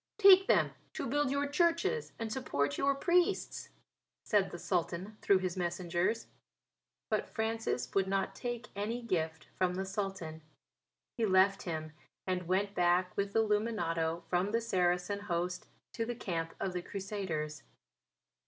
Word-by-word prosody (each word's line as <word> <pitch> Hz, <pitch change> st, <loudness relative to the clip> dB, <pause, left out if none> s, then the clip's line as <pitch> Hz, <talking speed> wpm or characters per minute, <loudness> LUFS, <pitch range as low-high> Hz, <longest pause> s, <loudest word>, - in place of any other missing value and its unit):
"Take 390 Hz, -2 st, +8 dB
them -, -, +4 dB, 0.2 s
to -, -, -3 dB
build 290 Hz, +2 st, +1 dB
your 280 Hz, +1 st, +1 dB
churches 340 Hz, +9 st, +1 dB
and 225 Hz, -1 st, -3 dB
support 145 Hz, -, 0 dB
your 275 Hz, -, +2 dB
priests," 350 Hz, +4 st, +1 dB, 0.5 s
said 205 Hz, -3 st, +2 dB
the -, -, -7 dB
Sultan 180 Hz, +3 st, -2 dB
through 200 Hz, -, +5 dB
his 185 Hz, -1 st, -2 dB
messengers. 175 Hz, +4 st, -1 dB, 0.9 s
But -, -, 0 dB
Francis 225 Hz, 0 st, -2 dB
would 195 Hz, -1 st, +2 dB
not 195 Hz, 0 st, 0 dB
take 240 Hz, -1 st, -5 dB
any 225 Hz, +4 st, -2 dB
gift 160 Hz, -7 st, -1 dB
from 180 Hz, -1 st, +2 dB
the 190 Hz, +1 st, -2 dB
Sultan. 190 Hz, -5 st, -4 dB, 0.8 s
He 230 Hz, -, +2 dB
left 190 Hz, +1 st, +4 dB
him 155 Hz, -3 st, -4 dB, 0.3 s
and 180 Hz, -2 st, -2 dB
went 195 Hz, +2 st, +1 dB
back 180 Hz, 0 st, +2 dB
with 200 Hz, 0 st, -2 dB
Illuminato 180 Hz, -7 st, +1 dB
from 180 Hz, +4 st, +1 dB
the 230 Hz, +2 st, +1 dB
Saracen 180 Hz, -1 st, +1 dB
host 180 Hz, -2 st, -2 dB, 0.3 s
to 230 Hz, -, -1 dB
the 240 Hz, +1 st, -3 dB
camp 165 Hz, -7 st, -3 dB
of 190 Hz, -, -2 dB
the 180 Hz, -, -2 dB
Crusaders. 175 Hz, -7 st, -4 dB
195 Hz, 145 wpm, -33 LUFS, 175-225 Hz, 0.9 s, Take